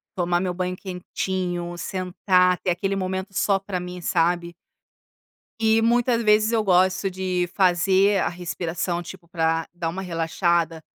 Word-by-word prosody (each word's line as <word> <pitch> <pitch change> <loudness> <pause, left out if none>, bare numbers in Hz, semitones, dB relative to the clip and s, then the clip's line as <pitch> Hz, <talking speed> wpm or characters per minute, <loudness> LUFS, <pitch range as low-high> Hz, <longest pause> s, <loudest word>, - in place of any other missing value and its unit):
tomar 175 -2 +1
o 180 - -2
meu 180 - -1
banho 180 0 -2
quentinho 180 -1 -4
sentar 180 0 +1
ter 185 - -2
aquele 195 +3 0
momento 190 +1 -3
só 195 0 +2
para 190 -2 -4
mim, 180 0 -7
sabe? 170 +1 0 1.1
E 220 0 +3
muitas 235 0 +2
vezes 215 +1 +4
eu 225 -2 +2
gosto 185 0 +3
de 185 -1 -1
fazer 190 +2 +3
a - - +1
respiração 175 0 -3
tipo 175 0 -11
pra 165 -1 0
da 175 -2 -3
uma 185 +4 -5
relaxada 165 -1 0
180 Hz, 150 wpm, -23 LUFS, 175-195 Hz, 1.1 s, vezes